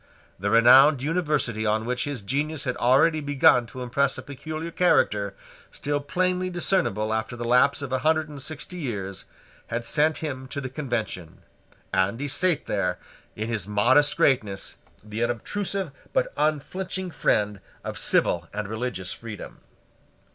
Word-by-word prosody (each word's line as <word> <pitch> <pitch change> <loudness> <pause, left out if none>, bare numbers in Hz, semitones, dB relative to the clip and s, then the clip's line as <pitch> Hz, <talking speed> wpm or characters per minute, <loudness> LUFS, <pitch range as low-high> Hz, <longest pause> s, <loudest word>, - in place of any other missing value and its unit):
The 100 +2 -1
renowned 130 +5 +7
University 150 -9 0
on 110 0 +1
which 125 +1 -1
his 140 -7 -4
genius 145 +7 -1
had 125 -2 -2
already 155 +6 +4
begun 135 -4 +4
to 125 +2 -7
impress 135 +2 +1
a - - -7
peculiar 155 +4 -6
character, 105 - +2 0.4
still 145 0 -2
plainly 185 +4 0
discernible 170 - 0
after 110 +2 -2
the 120 0 -5
lapse 125 +4 +3
of 135 - -5
a 130 - +1
hundred 155 +2 +2
and 145 -2 -9
sixty 155 +5 -6
years, 100 - -5 0.4
had 115 +1 -3
sent 155 +5 +2
him 130 -4 -5
to 140 - -5
the 130 -2 -4
Convention; 120 - -4 0.5
and 95 +5 +1
he 145 - -2
sate 160 +3 +1
there, 100 -3 -1 0.4
in 110 +1 -3
his 110 -5 -2
modest 130 +8 +3
greatness, 105 -7 +1 0.3
the 105 +2 -3
unobtrusive 185 - -2 0.2
but - - +1
unflinching 180 +5 -1
friend 105 -8 +1 0.2
of - - -5
civil 85 -1 +2
and 105 0 -4
religious 110 -4 -3
freedom. 110 -3 -9
130 Hz, 150 wpm, -25 LUFS, 110-155 Hz, 0.5 s, renowned